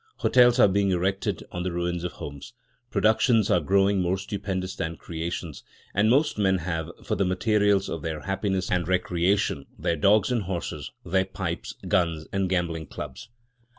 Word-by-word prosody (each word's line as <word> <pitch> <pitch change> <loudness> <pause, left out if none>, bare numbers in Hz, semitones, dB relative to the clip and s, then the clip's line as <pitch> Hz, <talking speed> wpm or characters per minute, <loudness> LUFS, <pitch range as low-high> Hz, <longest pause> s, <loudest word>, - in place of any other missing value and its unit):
Hotels 125 -1 +4
are - - +8
being 100 +1 +2
erected 95 +2 -1
on 90 - -4
the 90 0 -2
ruins 85 0 -2
of 90 - -3
homes; 70 -1 -9 0.4
productions 110 0 +3
are 90 - +5
growing 95 +4 +2
more 90 +1 +1
stupendous 95 -1 -4
than 80 0 -3
creations; 85 -2 -5 0.3
and 105 +2 +3
most 140 -1 +2
men 95 -2 +3
have, 80 -2 -3
for - - -2
the 100 - +1
materials 100 +1 +2
of 80 - -4
their 80 -2 -4
happiness 95 -1 -1
and 90 -2 +1
recreation, 90 -3 +1
their 85 - 0
dogs 100 +8 +3
and 120 -3 +1
horses, 90 -2 -4 0.2
their 95 +2 +1
pipes, 95 -3 -5
guns, 85 -3 +1
and 95 -1 0
gambling 85 -4 -1
clubs. - - -8
95 Hz, 165 wpm, -26 LUFS, 85-100 Hz, 0.4 s, are